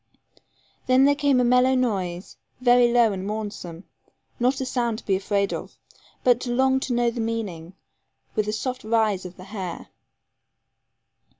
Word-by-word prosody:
Then 255 +1 +5
there 285 - +5
came 285 -2 +2
a - - +3
mellow 250 +2 +4
noise, 190 -8 -2 0.2
very 245 -1 +4
low 235 -3 +4
and 190 -1 -5
mournsome, 200 -5 -5 0.6
not 255 +2 +1
a 265 - -2
sound 240 -3 -1
to - - -12
be 195 - +2
afraid 200 +1 0
of, - - -7 0.5
but 245 -1 +4
to 250 - -4
long 265 +2 +2
to 265 - -3
know 240 0 +2
the 235 - -4
meaning, 195 -7 -4 0.6
with 215 -2 -1
a - - 0
soft 255 +4 -4
rise 215 -4 +1
of 180 - -14
the 185 - -11
hair. 190 -3 -7
230 Hz, 165 wpm, -24 LUFS, 200-250 Hz, 0.6 s, Then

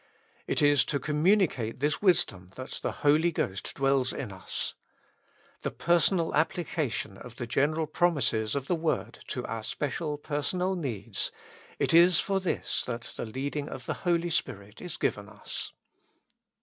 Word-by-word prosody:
It 155 - +1
is 145 -3 +6
to 140 - -1
communicate 150 - +2
this 145 +2 +1
wisdom 100 - +2
that 130 0 -6
the - - -1
Holy 155 +4 +5
Ghost 95 - -3
dwells 135 -1 +2
in 125 -7 -4
us. 95 -1 -3 0.9
The - - -1
personal 170 0 +2
applica 160 -3 0
tion 100 -3 -4
of 125 -2 -10
the 120 - -4
general 150 +6 +1
promises 140 -9 +1
of 140 -2 -1
the 175 - 0
word 165 -2 -1
to 125 - -3
our 115 - -3
special 150 +5 -2
personal 165 +6 -1
needs— 115 - -2 0.5
it - - +1
is 170 +1 +7
for 195 -1 +1
this 185 -2 -1
that 120 -1 -5
the - - -3
leadifig 140 +5 -3
of 130 - -7
the - - -1
Holy 175 -1 +1
Spirit 100 -8 -2
is 180 -3 -5
given 100 0 -1
us. 105 -1 -6
145 Hz, 155 wpm, -29 LUFS, 120-170 Hz, 0.9 s, is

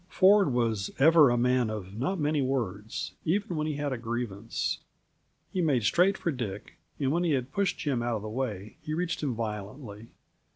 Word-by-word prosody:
Ford 195 -4 +5
was 115 -5 0
ever 155 0 +7
a 120 - +2
man 125 -1 +2
of 100 -3 -6
not 155 - -1
many 150 0 +1
words, 110 -6 -2
even 185 +1 0
when 155 0 -1
he 155 - -2
had 145 -1 -2
a 125 - -4
grievance. 115 -2 -3 0.7
He 185 - +1
made 140 -8 +2
straight 185 - +3
for 170 - -1
Dick, 110 -7 -6 0.2
and 135 -2 +1
when 170 +3 +1
he 165 -3 +2
had 130 0 -1
pushed 200 -1 0
Jim 140 -6 -1
out 120 -1 0
of 105 - -4
the - - -5
way, 110 -4 -4
he 155 - -3
reached 175 +1 -2
him 135 -6 -1
violently. 105 0 -6
130 Hz, 195 wpm, -29 LUFS, 110-155 Hz, 0.7 s, ever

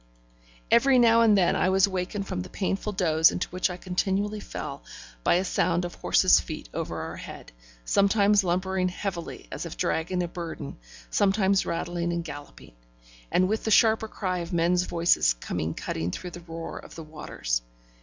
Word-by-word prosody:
Every 265 +2 +5
now 230 -1 +6
and 215 -3 +5
then 180 -3 +3
I 185 - +2
was 190 +1 +4
wakened 190 +1 -3
from 185 -2 -3
the 185 - -8
painful 195 +2 -2
doze 160 -3 +4
into 180 - -3
which 185 +1 0
I 180 - -5
continually 195 +3 -1
fell, - - -6 0.4
by - - +4
a 180 - +2
sound 175 -1 +1
of 175 - -6
horses' - - +4
feet - - -7
over - - -4
our - - -6
head: - - -10 0.3
sometimes 200 - +3
lumbering 185 +1 0
heavily 180 -2 -5
as - - -5
if - - -9
dragging 175 - -1
a - - -2
burden, 165 - -7 0.3
sometimes 195 -1 +2
rattling 175 0 -2
and 170 0 -2
galloping; 145 - -10 0.6
and 185 - +3
with 220 +3 -1
the - - -1
sharper 220 0 +4
cry 185 -4 -3
of 170 +1 -6
men's 175 +1 +2
voices 170 - +3
coming 80 +6 -4
cutting 80 +1 -3
through 180 - -6
the 175 - -9
roar 165 -1 -7
of - - -13
the 165 - -7
waters. 105 - -3
180 Hz, 175 wpm, -26 LUFS, 170-195 Hz, 0.6 s, now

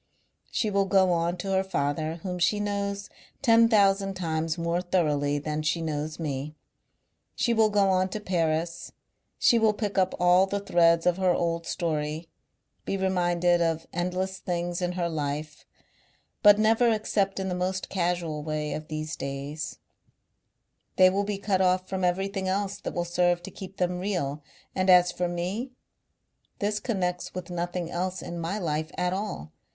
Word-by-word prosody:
"She 215 - -1
will 195 -1 +2
go 190 -1 +4
on 170 +1 0
to 195 +2 -4
her 190 0 +2
father 155 -3 -1
whom 180 -2 -3
she 190 +4 +2
knows 200 -1 -2 0.4
ten 230 -2 +6
thousand 195 -2 +3
times 160 -2 -2
more 170 +1 0
thoroughly 150 -6 +1
than 150 +1 -3
she 155 +2 0
knows 155 -1 -3
me; 150 -1 -4 0.8
she 235 - +1
will 220 -1 +4
go 200 -2 +3
on 185 0 +2
to 215 - -4
Paris, 165 -3 -1 0.4
she 235 - +4
will 220 -1 +4
pick 205 -2 -1
up 185 0 +1
all 180 +2 +5
the 200 +1 -1
threads 170 -4 +3
of 180 0 +3
her 185 -2 +2
old 170 -1 -1
story, 155 -1 -2 0.6
be 195 - -2
reminded 175 -2 +2
of 165 -1 0
endless 180 +2 -2
things 175 0 -2
in 180 0 -1
her 175 -1 -1
life, 150 -1 -4 0.7
but 205 -1 +8
never 225 +2 +4
except 210 -3 0
in 190 - -2
the 185 - -1
most 185 +1 -2
casual 175 -4 -1
way 150 0 -3
of 155 0 -6
these 155 0 -4
days: 140 +2 -5 1.2
they 185 0 +6
will 200 +2 0
be 205 -1 -2
cut 195 -1 0
off 185 0 +2
from 190 -1 -3
everything 190 +2 0
else 195 +1 -1
that - - -5
will 175 - -1
serve 175 0 +1
to 195 - -8
keep 190 +1 -10
them 180 -1 0
real; 170 -7 -2 0.3
and 185 0 0
as 180 -1 +7
for 180 0 -1
me 180 +9 -3 0.9
this 210 +1 -1
connects 180 -7 -2
with 180 -1 -6
nothing 175 0 -3
else 185 +1 -3
in 170 - -6
my 170 +5 -2
life 155 -4 -2
at 180 0 0
all.... 190 - -4
180 Hz, 170 wpm, -27 LUFS, 165-195 Hz, 1.2 s, but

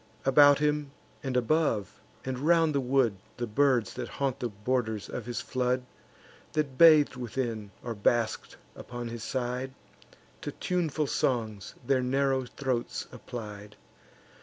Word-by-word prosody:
About 145 +1 +7
him, 150 -1 0 0.3
and 130 -2 -1
above, 125 - 0 0.2
and 130 -1 -3
round 165 +1 +3
the 140 - +2
wood, 125 -5 +2 0.2
The 120 - -2
birds 120 -1 +2
that 120 -1 -5
haunt 135 -2 -2
the 120 - -2
borders 110 0 -2
of - - -6
his 120 -2 -3
flood, 125 0 -1 0.7
That 150 -4 -1
bath'd 155 -2 +7
within, 120 -4 -3
or 120 - -3
basked 110 +2 0 0.2
upon 120 -1 -6
his 115 -1 -6
side, 130 +1 -3 0.7
To - - -4
tuneful 160 -4 -1
songs 110 -8 -1
their 130 0 +2
narrow 135 +1 +1
throats 125 -1 -3
applied. 105 -3 -8
125 Hz, 135 wpm, -29 LUFS, 115-140 Hz, 0.7 s, About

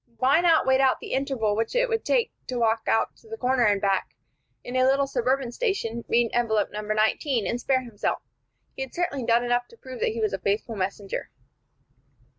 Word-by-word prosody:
Why 275 +7 +4
not 335 -2 +4
wait 265 0 +4
out 265 -1 +3
the - - -7
interval 265 -6 0
which 225 - -2
it - - +3
would 455 -2 -1
take 485 -2 +1 0.2
to 255 - -3
walk 225 -1 +1
to 330 - -1
the 450 - -6
corner 255 - +2
and 205 -1 +3
back 195 -1 0 0.5
in 245 - -6
a 255 - +4
little 275 +1 +3
suburban 260 -1 0
station, 240 - -2
read 235 -1 +2
envelope 220 -3 +1
No. 210 - -4
19, 215 +3 +1
and 240 +1 -2
spare 260 -1 +1
himself? 230 -4 -3 0.5
He - - -6
had 265 - -6
certainly 310 -7 -1
done 235 +1 +4
enough 245 0 0
to 465 - -18
prove 260 - -9
that - - +1
he 230 - -4
was 215 -2 0
a 195 - -2
faithful 210 +4 -1
messenger. 195 0 -4
245 Hz, 205 wpm, -25 LUFS, 220-270 Hz, 0.5 s, Why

